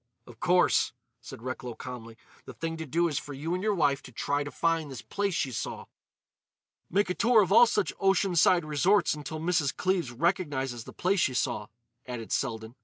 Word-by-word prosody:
"Of 115 -2 -15
course," 180 0 +3 0.3
said 115 - -10
Recklow 125 -2 -5
calmly, 115 -3 -9 0.3
"the - - -10
thing 165 0 -3
to 160 -1 -6
do 170 +5 +2
is 150 -4 -1
for 145 - -8
you 155 +5 -3
and 185 - -1
your 210 0 +1
wife 145 -5 +2
to 130 - -12
try 145 +4 -1
to 145 - -6
find 165 -1 0
this 130 -3 -8
place 200 -3 -2
she 135 - -1
saw." 115 - -5 1.0
"Make 195 +1 +1
a - - +1
tour 225 +1 +4
of 190 - -4
all 235 +3 +8
such 210 -3 0
ocean 195 -1 +2
side 170 0 +4
resorts 175 +5 +3
until 150 +1 -6
Mrs. 160 -4 0
Cleves 180 -8 0
recognises 135 -5 -1
the - - -9
place 190 +2 +1
she 130 -6 +1
saw," 105 -3 -1 0.4
added 120 -3 -6
Selden. 110 -3 -2
155 Hz, 195 wpm, -28 LUFS, 130-180 Hz, 1.0 s, all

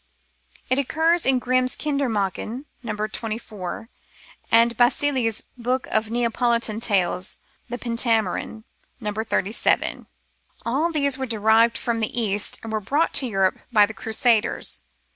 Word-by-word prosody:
It 260 - +3
occurs 320 +5 +2
in 265 -1 +4
Grimm's 255 0 +1
Kinder 280 -3 -1
Mdrchen 215 +5 -2 0.2
(No. 225 -4 -4
24), 215 -2 -5 0.6
and 230 +1 +5
in - - -10
Basili's 245 -2 +2
book 250 +2 -1
of 220 0 +1
Neapolitan 235 -1 +1
tales, 185 -5 0 0.3
the 245 - -3
Pentamerone 230 -3 -1 0.4
(No. 210 -3 -3
37). 215 0 0 0.6
All 285 +9 +1
these 280 -4 +2
were 265 - -2
derived 225 +1 +3
from 235 -1 -1
the 225 +2 -1
East, 205 -2 +1
and 225 -1 -6
were 215 - +1
brought 285 +11 0
to 260 - +2
Europe 195 -4 +1
by 210 -3 +6
the 220 - -8
Crusaders. 220 - 0
230 Hz, 135 wpm, -23 LUFS, 215-255 Hz, 0.6 s, by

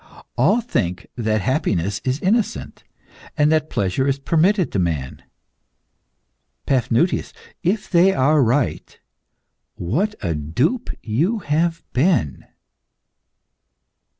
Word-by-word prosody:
All 240 - +3
think 90 - -2
that 110 -3 0
happiness 100 - -1
is 130 +2 -1
innocent, 215 +3 -1 0.5
and 150 0 +3
that 155 -1 +1
pleasure 100 +7 0
is 140 0 +1
permitted 170 +6 +1
to 100 - -1
man. 80 -7 -2 1.4
Paphnutius, 130 +6 +1 0.3
if 190 +4 -1
they 180 +2 +4
are 150 -1 +3
right, 125 +2 0 0.8
what 190 - -1
a 85 -3 0
dupe 120 - -1
you 160 - 0
have 165 +3 0
been!" 125 - +1
140 Hz, 100 wpm, -21 LUFS, 105-175 Hz, 1.4 s, they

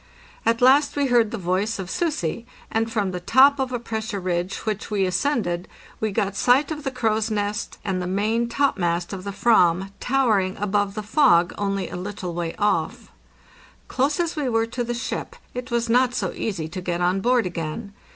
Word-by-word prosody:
At 230 +1 +2
last 280 +3 +5
we 285 -1 +1
heard 235 -3 +4
the 230 - -4
voice 190 +4 -1
of 190 -2 -5
"Sussi,"' 235 - -2 0.2
and 225 0 0
from 205 -4 0
the 180 - -4
top 265 +10 +5
of 260 -1 -1
a 245 - -1
pressure 220 -3 -4
ridge 180 0 -2
which 215 -2 -3
we 200 -3 +1
ascended 185 -3 0 0.3
we 220 -1 -1
got 200 0 -1
sight 260 +7 +3
of 300 -1 -4
the 270 - -1
crow's 225 -3 0
nest 210 0 -2
and 190 -3 -1
the 180 - -3
main 215 +5 0
topmast 180 -10 0
of 185 -1 -6
the 200 - -4
/ram, 195 -3 +3
towering 220 -8 +1
above 205 0 0
the 215 - -4
fog, 210 - +4
only 195 -2 -2
a - - -6
little 185 -1 -5
way 170 -1 -3
off. 210 0 -1 0.8
Close 280 +4 0
as 340 -1 0
we 290 -4 -1
were 225 -1 +2
to 240 +2 -3
the 240 0 -3
ship, 240 - -4 0.2
it 250 +1 -5
was 235 -1 0
not 250 +1 +3
so - - -1
easy 180 -8 -3
to 185 +4 -6
get 175 -1 -2
on 180 +2 +1
board 245 +1 +3
again. 175 +4 -5
215 Hz, 195 wpm, -23 LUFS, 185-245 Hz, 0.8 s, last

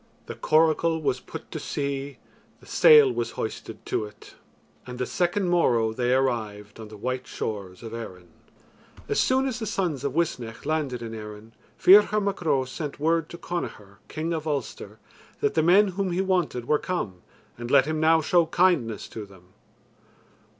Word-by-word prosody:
The - - -6
coracle 160 +1 +2
was 130 -4 -1
put - - -10
to - - -4
sea, 140 -1 -4 0.4
The - - -19
sail 150 -4 +6
was 115 -1 -3
hoisted 110 - -6
to 110 - -1
it; 105 0 -14 0.5
And 125 0 -7
the 125 - -1
second 180 +5 0
morrow 120 -10 +2
they 125 +1 0
arrived 110 -5 -1
On 110 - -8
the 105 0 -11
white 130 +4 -4
shores 100 -2 -5
of 115 -1 -8
Erin. 90 -6 -8 0.8
As - - 0
soon 260 +1 +2
as 250 -3 -3
the 220 - -4
sons 170 -9 -2
of 140 -1 -2
Uisnech 125 -9 -2
landed 145 -6 -2
in 115 -1 -6
Erin, 105 0 -9 0.2
Ferchar 205 +2 +6
Mac 200 -2 -2
Ro 140 -6 +1
sent 145 +3 -6
word 165 +1 +1
to 170 - -9
Connachar, 105 - -6
king 160 +2 -3
of 160 -1 -4
Ulster, 145 -2 -4 0.4
that 430 -1 +1
the - - +2
men 190 +5 +5
whom 190 0 -2
he 175 - -1
wanted 180 -10 0
were 150 +3 +2
come, 100 - -4 0.3
and 120 0 -7
let 135 -1 +5
him 155 +1 -2
now 160 +1 +4
show 170 +2 +3
kindness 165 - +1
to 105 -2 -8
them. 95 -2 -18
140 Hz, 175 wpm, -25 LUFS, 115-170 Hz, 0.8 s, sail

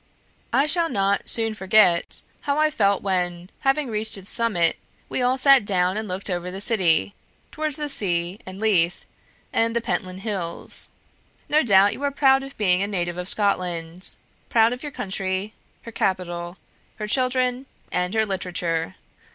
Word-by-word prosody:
I 275 - +3
shall 330 +2 +1
not 200 -3 0
soon 225 -1 +2
forget 190 -3 +2 0.2
how 285 0 -2
I 310 0 +3
felt 200 -8 +1
when, 180 -2 -2
having 270 +1 +1
reached 215 0 -1
its 195 0 -5
summit, 205 -8 +2 0.3
we - - -2
all 250 +1 +2
sat 275 -2 +6
down 185 -2 +1
and 215 0 -3
looked 185 +1 -3
over 180 -1 -2
the 190 +1 -6
city 175 - +2 0.4
towards 305 -2 -1
the 300 -1 -3
sea 180 -6 0
and 185 +1 -9
Leith, 185 -5 +1 0.5
and 230 0 +1
the - - +3
Pentland 185 -4 -4
Hills. 190 -6 -2 0.6
No 305 +1 +3
doubt 200 -4 +5
you - - -9
are 285 - +1
proud 270 -1 +3
of 270 0 -10
being 185 -3 +2
a 200 - 0
native 175 -3 -1
of 180 +1 +4
Scotland, 180 -3 0 0.3
proud 230 +1 +4
of 250 - -8
your 295 - -6
country, 190 -1 -3 0.3
her 230 - -9
capital, 175 -3 -2 0.4
her 215 - -5
children, 255 +2 0 0.2
and 180 +3 -1
her 220 0 +2
literature. 180 -3 -2
200 Hz, 165 wpm, -23 LUFS, 180-245 Hz, 0.6 s, sat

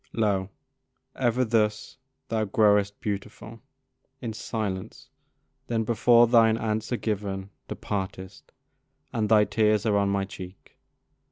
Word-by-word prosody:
Lo! 100 -4 0 0.7
ever 125 0 +1
thus 110 +1 0 0.3
thou 110 -1 0
growest 105 -1 +2
beautiful 105 +2 -6 0.6
In 115 -4 -5
silence, 105 -4 -5 0.6
then 115 -1 0
before 120 +1 +5
thine 115 -1 +4
answer 110 +2 -2
given 100 -3 -3 0.2
Departest, 95 -2 -6 0.6
and 110 -3 -1
thy 105 -1 +5
tears 105 +1 +1
are 105 -2 +2
on 100 0 +2
my 100 0 0
cheek. 95 -1 -11
105 Hz, 110 wpm, -26 LUFS, 100-115 Hz, 0.7 s, before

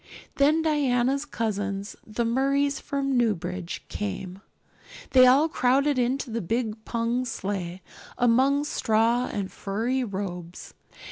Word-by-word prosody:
Then 300 +3 +4
Diana's 275 -3 +1
cousins, 205 -6 -3
the 225 +2 -2
Murrays 275 +4 +1
from 275 -1 -2
Newbridge, 185 -6 -1
came; 195 -2 -5 0.7
they 255 -1 +7
all 275 +5 +5
crowded 275 0 +2
into 250 +1 -1
the 230 +1 -2
big 220 +3 -2
pung 235 +2 -1
sleigh, 190 -6 -4 0.3
among 260 +4 +3
straw 230 -2 +1
and 195 -2 -3
furry 230 +6 -2
robes. 185 -5 -6
235 Hz, 115 wpm, -26 LUFS, 200-270 Hz, 0.7 s, they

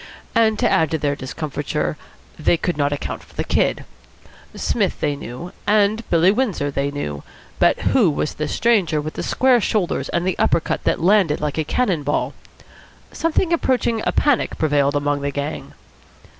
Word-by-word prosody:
And, 220 -2 +3
to - - +2
add 160 -2 +2
to 160 - 0
their 145 -2 -1
discomfiture, 145 +2 -3 0.4
they 160 +2 +3
could 175 +1 -2
not 145 -1 0
account 145 - -4
for - - -21
the - - -1
Kid. - - 0 0.7
Psmith - - -1
they 145 - 0
knew, 140 +6 -8 0.2
and 210 +2 +2
Billy 170 +3 +4
Windsor 205 - -1
they 140 0 -1
knew, 75 - -4 0.4
but - - +4 0.2
who 225 -10 +5
was 150 0 -2
this 150 -1 -4
stranger 200 -10 +2
with 155 +1 -5
the - - -5
square 255 -2 +3
shoulders 195 -3 -1
and 170 0 -1
the 185 - -1
upper - - +3
cut - - -4
that - - +1
landed 185 -5 +3
like 150 0 -2
a - - +2
cannon 185 -1 0
ball? 145 +1 -1 0.8
Something 330 +1 0
approaching 245 -7 +1
a - - +1
panic 290 -5 +1
prevailed 145 -2 +2
among 145 0 0
the 140 - -1
gang. 145 +2 -5
160 Hz, 175 wpm, -21 LUFS, 145-215 Hz, 0.8 s, who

